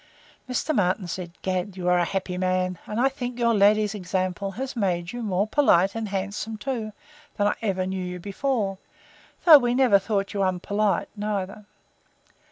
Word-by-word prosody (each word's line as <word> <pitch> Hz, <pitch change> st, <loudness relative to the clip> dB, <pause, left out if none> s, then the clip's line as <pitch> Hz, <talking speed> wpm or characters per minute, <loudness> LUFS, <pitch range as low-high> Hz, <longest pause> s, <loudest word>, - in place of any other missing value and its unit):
Mr. 255 Hz, +5 st, -1 dB
Martin 185 Hz, -4 st, +1 dB
said, 175 Hz, 0 st, -5 dB
Gad, 185 Hz, +1 st, -2 dB
sir, -, -, -10 dB
you 175 Hz, -, -2 dB
are 180 Hz, 0 st, +4 dB
a 175 Hz, -, +2 dB
happy 190 Hz, 0 st, -3 dB
man; 185 Hz, -1 st, 0 dB
and 210 Hz, -, -3 dB
I 260 Hz, -, +4 dB
think 250 Hz, -3 st, -4 dB
your 235 Hz, -1 st, +2 dB
lady's 210 Hz, 0 st, +4 dB
example 185 Hz, 0 st, -2 dB
has 265 Hz, +5 st, -5 dB
made 180 Hz, -5 st, -1 dB
you 240 Hz, -, -5 dB
more 200 Hz, -3 st, 0 dB
polite 200 Hz, -7 st, +3 dB
and 225 Hz, -2 st, -4 dB
handsome 200 Hz, +3 st, -3 dB
too, 225 Hz, -2 st, -3 dB, 0.5 s
than 205 Hz, -, +2 dB
I 205 Hz, -, +2 dB
ever 190 Hz, -4 st, -1 dB
knew 190 Hz, 0 st, -3 dB
you 180 Hz, 0 st, -5 dB
before, 200 Hz, 0 st, -2 dB, 0.7 s
though 315 Hz, -4 st, +10 dB
we 245 Hz, -1 st, 0 dB
never 250 Hz, -6 st, +5 dB
thought 200 Hz, 0 st, -2 dB
you 200 Hz, -, -1 dB
unpolite, 195 Hz, +2 st, 0 dB
neither. 205 Hz, -1 st, -4 dB
200 Hz, 175 wpm, -25 LUFS, 185-225 Hz, 0.7 s, though